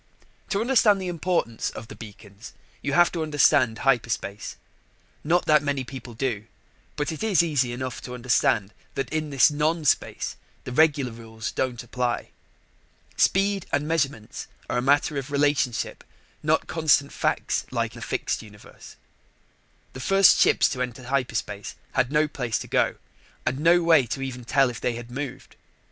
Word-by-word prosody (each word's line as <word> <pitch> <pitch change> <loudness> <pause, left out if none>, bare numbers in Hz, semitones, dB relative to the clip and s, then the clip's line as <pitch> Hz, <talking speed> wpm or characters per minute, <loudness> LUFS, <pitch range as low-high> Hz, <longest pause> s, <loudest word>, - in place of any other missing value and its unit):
To 200 - 0
understand 225 -5 +4
the 185 -1 -3
importance 170 -9 -1
of 110 - -9
the - - -10
beacons, 105 0 -12 0.3
you 145 - -2
have 175 +3 +5
to 170 - -3
understand 140 -6 +3
hyperspace. 115 -5 -1 0.7
Not 175 +4 +2
that 150 -1 +5
many 145 -2 -1
people 125 -2 -9
do, 115 -3 -2 0.5
but 145 +2 -2
it 160 - -7
is 205 -6 +3
easy 140 -7 +1
enough 130 0 -5
to 125 - -7
understand 115 -4 +1 0.2
that 135 +2 -3
in 155 -1 -1
this 140 +1 +5
non 155 +2 0
space - - 0 0.3
the - - -6
regular 145 -2 +3
rules 115 0 -7
don't 125 -2 -2
apply. 120 0 -2 0.8
Speed 195 0 +2
and 145 +1 0
measurements 140 -9 -2 0.2
are - - 0
a - - -1
matter 145 +3 +2
of 135 +1 -7
relationship, 140 -4 0 0.4
not - - +1
constant 155 -3 +2
facts - - -1
like - - -2
the - - -11
fixed - - -2
universe. 105 -2 -14 1.0
The 130 - -8
first 195 +7 +5
ships - - +5
to 125 - -4
enter 125 0 -4
hyperspace 120 -6 -3 0.2
had 125 - +1
no 150 +1 +3
place 125 -6 -2
to - - -7
go - - +1 0.5
and 135 - -1
no 170 +3 +4
way 160 -7 +5
to 135 +4 -3
even 125 -2 -6
tell 135 +1 +3
if 120 - -9
they 125 - 0
had 120 0 -8
moved. 135 +2 -7
135 Hz, 160 wpm, -25 LUFS, 120-155 Hz, 1.0 s, have